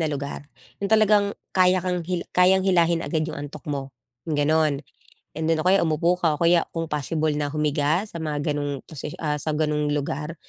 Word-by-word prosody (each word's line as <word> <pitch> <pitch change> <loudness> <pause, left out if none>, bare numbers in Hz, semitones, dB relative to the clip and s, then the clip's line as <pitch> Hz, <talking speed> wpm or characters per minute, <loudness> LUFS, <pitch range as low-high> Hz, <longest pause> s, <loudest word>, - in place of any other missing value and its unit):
na 160 - +1
lugar. 140 0 -5 0.3
Yung 200 - -1
talagang 210 -2 +4 0.2
kaya 185 0 +4
kang 180 -1 -1
hila 180 -2 -2
kayang 185 +1 +4
hilahin 170 -2 +3
agad 160 -2 -1
yung 160 - -6
antok 145 -1 -8
mo, 135 -2 -4 0.3
ganon. 150 -1 +1 0.6
And 160 0 -2
then, 160 -1 +2
o - - -6
kaya 195 +2 +5
umupo 170 +3 +1
ka, 165 -4 +2
o - - -29
kaya 170 0 +4
kung 165 -1 -3
possible 155 +1 -1
na 145 - 0
humiga, 150 +3 +1
sa 170 - -8
mga 150 -1 -1
ganong 145 -2 -3
position 150 -1 -7
ah 150 -1 0
sa 155 +1 -1
ganong 150 -1 0
lugar, 150 +2 -3
155 Hz, 195 wpm, -24 LUFS, 150-175 Hz, 0.6 s, kaya